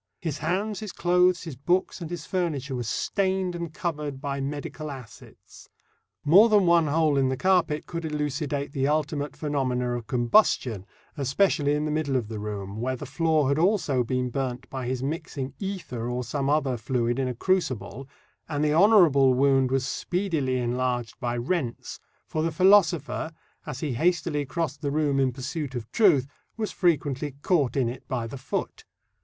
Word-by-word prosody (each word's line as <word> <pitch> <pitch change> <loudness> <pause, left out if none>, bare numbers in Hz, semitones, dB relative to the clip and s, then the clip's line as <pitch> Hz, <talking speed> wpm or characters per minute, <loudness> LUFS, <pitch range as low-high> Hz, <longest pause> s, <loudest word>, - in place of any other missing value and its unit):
His 160 -5 -3
hands, 190 +6 -1
his 215 -3 -6
clothes, 180 0 +3
his 160 -6 -7
books, 175 +7 0
and 165 - -5
his 170 -2 -6
furniture, 150 -7 -2
were 125 - -2
stained 190 - -1
and 170 -2 -5
covered 150 -7 -4
by 140 -1 -3
medical 150 +2 -5
acids 130 -6 -12 0.6
more 195 +10 +7
than 205 -3 +4
one 170 -2 +4
hole 155 -1 +2
in 135 -1 +2
the 130 - -1
carpet 180 -4 +2
could 170 -1 -5
elucidate 150 -2 -2
the 135 -2 0
ultimate 150 -1 -1
phenomena 130 -5 -1
of 120 -3 -6
combustion, 120 - +2 0.3
especially 145 +1 +2
in 150 +1 -1
the 155 - -1
middle 150 -3 -1
of 115 -4 -1
the 110 -2 -5
room, 105 0 -5
where 130 +1 -1
the 140 - -7
floor 155 0 +1
had 140 +2 +1
also 170 - +2
been 125 +1 -1
burnt 130 -1 -3
by 130 -2 -4
his 130 0 -2
mixing 140 -2 -4
ether 175 - -4
or 125 +1 -2
some 135 +3 -2
other 140 -4 +1
fluid 120 +1 -1
in 130 - 0
a 125 - -3
crucible, 135 - -1 0.4
and 145 -1 -1
the 150 0 +2
honourable 160 - +6
wound 135 -1 +3
was 135 0 0
speedily 160 -4 -1
enlarged 125 -1 -1
by 120 -2 -2
rents, 125 -1 -3 0.3
for 155 - -2
the 165 +1 0
philosopher, 175 -3 +3 0.4
as 135 -3 -5
he 145 -5 -2
hastily 155 0 0
crossed 155 -1 -3
the 145 - -1
room 145 -1 +1
in 135 -1 +2
pursuit 135 +2 -5
of 115 -2 -6
truth, 175 - +4 0.3
was 215 -2 -2
frequently 145 -5 0
caught 145 - +2
in 130 -3 +2
it 125 +2 -7
by 120 -3 -2
the 125 +4 -7
foot. 130 - -4
145 Hz, 175 wpm, -26 LUFS, 130-165 Hz, 0.6 s, more